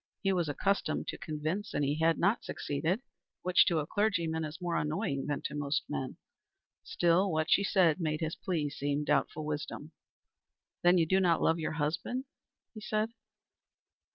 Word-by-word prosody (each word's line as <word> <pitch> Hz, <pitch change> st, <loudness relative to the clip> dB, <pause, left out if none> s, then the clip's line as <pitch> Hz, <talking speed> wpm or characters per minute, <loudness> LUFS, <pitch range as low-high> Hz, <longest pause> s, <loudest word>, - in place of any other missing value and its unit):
He 195 Hz, -1 st, +3 dB
was 175 Hz, -4 st, 0 dB
accustomed 195 Hz, +1 st, 0 dB
to -, -, -4 dB
convince, 155 Hz, +6 st, -3 dB
and 145 Hz, -, +1 dB
he 145 Hz, +3 st, 0 dB
had 165 Hz, 0 st, +3 dB
not 200 Hz, +7 st, +2 dB
succeeded, 165 Hz, -, -2 dB, 0.4 s
which 180 Hz, 0 st, +5 dB
to 170 Hz, -, +2 dB
a 150 Hz, -, 0 dB
clergyman 170 Hz, -5 st, 0 dB
is 155 Hz, +1 st, -6 dB
more 175 Hz, -1 st, -2 dB
annoying 150 Hz, -2 st, -1 dB
than 145 Hz, -1 st, -2 dB
to -, -, -4 dB
most 145 Hz, +1 st, -1 dB
men. 130 Hz, -, -4 dB, 0.7 s
Still 175 Hz, +3 st, +2 dB
what 155 Hz, +1 st, 0 dB
she 200 Hz, -, +5 dB
said 185 Hz, -4 st, +3 dB
made 155 Hz, -1 st, 0 dB
his 160 Hz, 0 st, -2 dB
plea 155 Hz, -6 st, -2 dB
seem 145 Hz, +1 st, -1 dB
doubtful 155 Hz, +1 st, 0 dB
wisdom. 150 Hz, 0 st, -4 dB, 0.9 s
"Then 175 Hz, +1 st, +5 dB
you 165 Hz, -, +4 dB
do 190 Hz, +4 st, +3 dB
not 175 Hz, -3 st, +3 dB
love 165 Hz, +1 st, +3 dB
your 155 Hz, -, -2 dB
husband?" 170 Hz, -, -2 dB, 0.5 s
he 215 Hz, -, -9 dB
said. 215 Hz, 0 st, 0 dB
165 Hz, 170 wpm, -31 LUFS, 150-185 Hz, 0.9 s, which